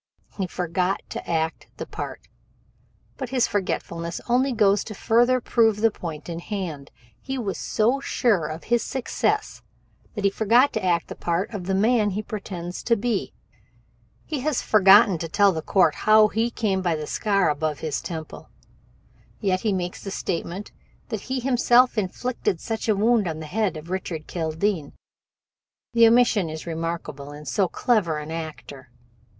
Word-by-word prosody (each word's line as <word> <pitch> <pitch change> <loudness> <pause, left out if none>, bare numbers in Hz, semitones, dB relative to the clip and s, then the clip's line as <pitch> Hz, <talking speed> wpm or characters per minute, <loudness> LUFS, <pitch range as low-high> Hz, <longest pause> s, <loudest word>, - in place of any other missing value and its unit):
He 190 -3 -2
forgot 180 +2 -1
to - - -6
act 160 -1 -1
the - - -5
part. - - -6 1.0
But 260 -3 -5
this 255 -2 +2
forgetfulness 170 -4 -3
only 255 +3 +2
goes 205 -3 +3
to 215 - -7
further 240 +5 +3
prove 225 -3 +2
the 225 +1 +3
point 160 -6 -7
in 170 -1 -4
hand. 170 -8 -5 0.3
He 270 0 -4
was 205 -6 -3
so 235 +6 +1
sure 215 - +1
of 155 +2 -7
success 240 +2 -1 0.5
that 205 - -4
he 200 - +3
forgot 230 +7 +3
to 220 - -2
act 175 -2 +1
the - - -7
part 175 +6 -2
of 190 -4 -5
the 190 +1 0
man 215 +1 +3
he 205 +2 -3
pretends 185 -5 -6
to 235 - +4
be. 225 -1 -2 0.9
"He 300 - -3
has 285 0 0
forgotten 195 -3 +6
to 165 - -4
tell 200 +3 +4
the 160 -3 -3
court 170 -1 +3
how 215 0 +5
he 225 +3 0
came 205 -5 -1
by 175 -3 +1
that 155 -1 -4
scar 195 -2 +1
above 150 0 -2
his 155 -3 -2
temple, 160 -3 -7 0.9
yet 185 -3 0
he 215 - +1
makes 180 -2 -3
the 195 - -5
statement 185 +1 -4 0.4
that 215 - -3
he 260 +3 -3
himself 250 -1 +4
inflicted 210 -1 -2
such 225 0 -4
a 215 - +4
wound 215 0 +3
on 160 -1 -4
the 160 - -6
head 195 +1 -1
of 160 +3 -9
Richard 175 -4 -4
Kildene 165 0 -2 1.0
the 230 -1 +7
omission 230 -6 +4
is 155 0 -7
remarkable 165 -4 -4
in 150 +1 -10
so 195 +3 +1
clever 180 -5 +1
an 150 +1 -6
actor. 155 -5 -7
195 Hz, 165 wpm, -24 LUFS, 165-225 Hz, 1.0 s, the